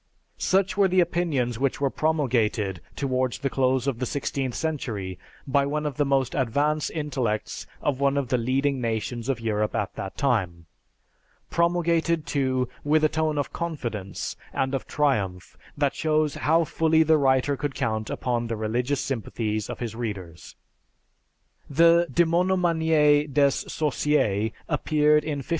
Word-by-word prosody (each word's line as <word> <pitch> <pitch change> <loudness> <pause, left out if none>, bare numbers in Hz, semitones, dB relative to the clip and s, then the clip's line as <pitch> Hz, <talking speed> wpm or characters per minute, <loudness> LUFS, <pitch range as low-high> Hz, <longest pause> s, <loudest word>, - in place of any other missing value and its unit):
Such 190 0 +1
were 200 -1 +5
the 185 0 +2
opinions 160 -9 0
which 135 -1 0
were 140 -2 +1
promulgated 115 - 0
towards 130 -3 -1
the 135 +1 -2
close 130 -1 +1
of 135 -4 -1
the 130 - -1
sixteenth 135 -2 -2
century 115 - -3 0.3
by 140 0 +2
one 150 +1 -2
of 145 -3 -3
the 145 - +2
most 135 -2 +1
advanced 145 +4 0
intellects 130 -9 -3 0.2
of 140 -3 0
one 140 0 +2
of 135 -4 -1
the 125 - +2
leading 135 +3 0
nations 115 +1 -3
of 130 -3 0
Europe 105 -2 -1
at 105 - -2
that 95 - -6
time; 95 - 0 0.9
promulgated, 170 -2 +1
too, 130 -3 0 0.2
with 155 +1 +2
a 155 - +5
tone 155 -1 0
of 145 - -2
confidence 120 - -4 0.2
and 130 0 -1
of 135 - -3
triumph 100 -11 -1 0.2
that 145 -1 +1
shows 155 -2 +1
how 160 +4 +2
fully 160 0 +2
the 160 0 +4
writer 135 +1 +2
could 140 0 -4
count 110 -1 -2
upon 120 -2 -1
the 115 - -2
religious 120 +6 -1
sympathies 110 -4 -3
of - - -5
his 115 -3 -4
readers: 100 -8 -6 1.1
the 170 +3 +5
"Demonomanie 160 -4 +3
des 140 0 +4
Sorciers" 135 -9 0 0.2
appeared 150 0 +2
in 145 -2 -3
1581. - - -21
140 Hz, 150 wpm, -25 LUFS, 120-155 Hz, 1.1 s, were